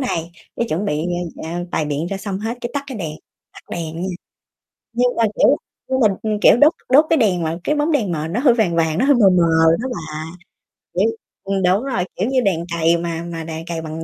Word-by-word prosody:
này 170 -10 -2 0.3
cái 235 - 0
chuẩn 175 +4 -1
bị, 155 -5 -1 0.4
a, 165 +2 -4
bày 160 - 0
biện 150 +2 -2
ra 195 - -3
xong 195 -1 -4
hết 225 +4 -4
cái 240 - -4
tắt 285 0 -2
cái 260 -5 -6
đèn, 160 -5 -4 0.4
tắt - - -13
đèn 165 0 -4
nha, 190 - -2 0.8
nhưng 245 +1 +1
mà 230 - +3
kiểu - - +5 0.3
nhưng 260 0 0
mà, 230 - +5 0.2
ừm, 215 -1 -1
kiểu - - +7
đốt 290 +5 +6 0.2
đốt 290 +4 +7
cái 325 - +5
đèn 195 - +2
mà 165 +1 -2
cái 300 - +1
bóng 300 +2 +1
đèn 215 -11 +1
mờ 155 0 -2
nó 215 +8 -1
hơi 255 -3 +5
vàng 215 -8 +1
vàng, 160 -1 +1
nó 250 - +2
hơi 285 - +5
mờ 210 -6 +5
mờ 180 -2 +4 0.4
đó 260 - -2
bà, 155 -5 -6 0.8
kiểu 195 +6 +2 0.3
ừm, 195 0 -1
đúng 185 +5 +3
rồi, 230 -10 -1
kiểu 195 - -1
như 260 -1 +2
đèn 175 -6 0
cầy 165 +1 +4
mà 170 -1 -3
mà 170 -1 -5
đèn 160 0 -6
cầy 165 -1 -3
bằng 160 0 -6
190 Hz, 240 wpm, -20 LUFS, 165-240 Hz, 0.8 s, kiểu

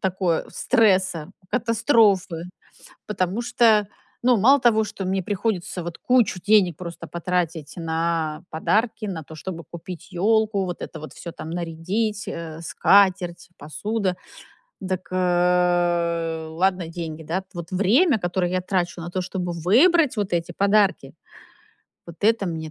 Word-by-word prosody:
такое- 185 -3 0
стресса, 190 -9 +2 0.2
катастрофы! 220 - +2 0.6
Потому 190 +1 -1
что, 220 -4 +3 0.3
ну, 245 0 +4
мало 265 +7 +5
того, 225 -3 +3
что 200 -2 -6
мне 190 +1 -1
приходится 190 -2 -2
вот 170 0 -7
кучу 245 -7 +2
денег 200 -5 +4
просто 170 -1 -8
потратить 170 -3 -2
на 165 -1 -2
подарки. 215 +7 0
На 180 -5 -4
то, 160 - -12
чтобы 170 +1 -7
купить 170 +3 -10
ёлку, 210 +2 +2
вот 180 -1 -5
это 160 - -7
вот 155 - -9
всё 170 - -8
там 160 - -8
нарядить, 180 +6 -2
э, 165 -1 -6
скатерть, 180 -1 +2
посуда. 190 +5 -2 0.6
Дак, 185 -1 -4
э, 175 -2 +1
ладно, 180 +1 0
деньги, 165 -2 -6
да. 175 +5 -2
Вот 170 -1 -7
время, 225 - +3
которое 175 -1 -1
я 185 0 0
трачу 180 -2 -1
на 170 +1 -6
то, 185 - -2
чтобы 180 -1 -4
выбрать 255 - +4
вот 205 -3 -2
эти 170 0 -1
подарки- 200 +2 +2 0.9
вот 170 -1 -10
это 220 -2 +3
мне 160 -2 -4
180 Hz, 135 wpm, -23 LUFS, 170-205 Hz, 0.9 s, мало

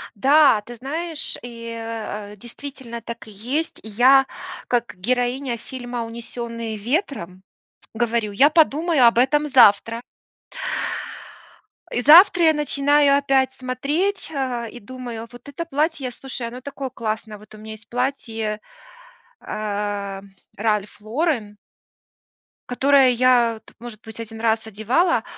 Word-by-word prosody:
Да, 275 0 +5
ты 240 +3 -11
знаешь, 310 +6 -3
и, 230 -1 -8
э, 215 -2 -6
действительно, 240 +2 -9
так 235 0 -8
и - - -11
есть. 250 +11 -3
Я 255 +5 +5 0.4
как 240 -3 -1
героиня 245 +5 -1
фильма 245 0 -6
"Унесенные 230 -1 -6
ветром" 210 - -3 0.5
говорю: 230 -2 0
"Я 270 +9 +5
подумаю 315 -2 +3
об 235 - +3
этом 295 +4 +3
завтра". 230 -3 +5 1.9
И 245 - -1
завтра 345 +6 +8
я 320 - +6
начинаю 290 -1 +3
опять 270 -2 +2
смотреть, 280 +10 -2
а, 255 -5 -2
и 240 - -10
думаю, 240 -1 -7
вот 245 +3 -12
это 310 +4 -5
платье, 295 -3 -1
слушай, 255 -1 -6
оно 245 +2 -8
такое 275 0 -6
классное. 220 -2 -4
Вот 215 +1 -15
у - - -12
меня 215 +1 -9
есть 220 0 -12
платье, 225 -4 -2 0.8
а, 205 -2 -4 0.4
Ralph 210 -1 -1
Lauren 225 -3 -1 1.1
которое 270 +1 +4
я 240 -2 +3
т - - -17
может 235 -2 -9
быть, 220 0 -11
1 225 -1 -8
раз 225 -1 +1
одевала, 235 - +1
240 Hz, 125 wpm, -22 LUFS, 220-275 Hz, 1.9 s, завтра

